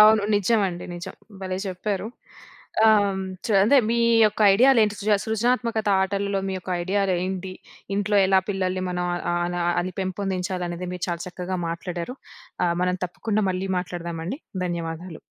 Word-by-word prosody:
అవును. 215 0 +7
నిజమండి. 200 -3 +1
నిజం. 180 +2 -7 0.3
భలే 185 -1 -3
చెప్పారు. 195 +2 -3 0.8
ఆహ్, 215 -1 +7
హ్మ్, 190 -1 -2 0.2
చ - - -5 0.2
అదే, 275 +5 +6
మీ 235 - +2 0.3
యొక్క 210 +1 -3
ఐడియాలేంటి, 225 -3 +5
సృజ 215 +1 -1
సృజనాత్మకత 225 -1 0
ఆటలలో 200 0 -1
మీ - - -2
యొక్క 185 - -8
ఐడియాలు 195 0 +1
ఏంటి, 190 0 -4 0.4
ఇంట్లో 205 0 +1
ఎలా 190 0 +5
పిల్లల్ని 185 -1 -1
మనం 180 0 -2
ఆహ్, 175 - -2
ఆహ్, 175 - 0
అలా 175 0 -2 0.2
అని 185 +1 -4
పెంపొందించాలనేది 185 -2 -3
మీరు 180 - -3
చాలా 170 -1 -2
చక్కగా 180 +1 -4
మాట్లాడారు. 175 +7 -5 0.5
ఆహ్, 170 -1 +2
మనం 180 0 +1
తప్పకుండా 215 +4 -1
మళ్ళీ 185 +1 -3
మాట్లాడదామండి. 175 - -5 0.3
ధన్యవాదాలు. 165 0 -5
190 Hz, 150 wpm, -24 LUFS, 180-210 Hz, 0.8 s, అవును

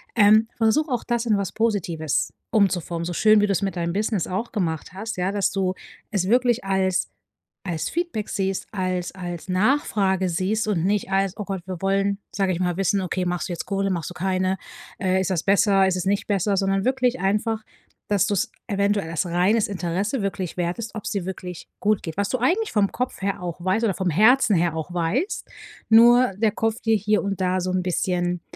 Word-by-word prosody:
Ähm, 215 0 +6
versuche 260 +7 +2
auch 245 - -1
das 240 -1 -1
in 215 -2 +3
was 200 -3 -2
Positives 175 -9 -1 0.2
umzuformen, 180 -6 +1
so 175 - -3
schön, 215 +4 +5
wie - - +4
du 200 - +1
es 185 - 0
mit 195 -1 -2
deinem 170 0 -1
Business 210 -2 -1
auch 195 +6 -3
gemacht 170 -4 -2
hast. 220 +4 -5
Ja, 180 +2 0
dass 200 -1 0
du 190 -2 0 0.4
es 190 -3 0
wirklich 245 -1 +2
als 190 -1 +1 0.6
als 165 -3 -2
Feedback 335 - -3
siehst, 195 -1 -2
als 185 -3 -2
als 175 -1 -6
Nachfrage 190 -3 +1
siehst 195 +6 -1
und 180 -5 0
nicht 200 0 0
als: 195 0 +1
„Oh 210 - -4
Gott, 195 -2 -4
wir 185 -3 -6
wollen”, 195 +1 +1
sage 195 -2 0
ich 170 - -3
mal, 180 -1 0
„wissen, 195 +1 +1
okay, 185 0 -2
machst 180 +1 -2
du - - -2
jetzt 170 - -5
Kohle? 195 0 -1
Machst 170 -2 -3
du - - -8
keine? 185 +1 0 0.4
Äh, 190 -1 +1
ist 190 - -1
das 175 -4 0
besser? 195 -1 +4
Ist 190 - +1
es 180 - -3
nicht 200 +2 0
besser?” 200 0 +1
sondern 195 0 +1
wirklich 255 -1 +1
einfach, 210 +3 0 0.4
dass 200 -1 +2
du's 205 -2 0 0.2
eventuell 200 -4 0
als 165 +3 -1
reines 180 +6 +2
Interesse 195 +5 -2
wirklich 190 -3 -3
wert 175 0 -1
ist, 225 -1 -5
ob's 215 - -4
dir 195 -4 -2
wirklich 180 -2 -7
gut 210 -1 +1
geht. 160 0 -6
Was 200 0 0
du 255 - 0
eigentlich 375 - +1
vom 205 -2 +2
Kopf 250 -4 -3
her 195 -2 -1
auch 175 -1 -5
weißt 190 +5 +1
oder 200 -5 0
vom 185 -2 -1
Herzen 215 - +5
her 170 -1 +1
auch 160 +2 -5
weißt, 190 - -1 0.4
nur 240 +1 +6
der 220 0 +2
Kopf 225 +2 -2
dir 225 -1 +2
hier 210 +1 +1
und 195 -1 -3
da 185 0 +1
so 185 +1 -2
'n 185 0 +1
bisschen 180 -1 -1
195 Hz, 210 wpm, -23 LUFS, 180-215 Hz, 0.6 s, Ähm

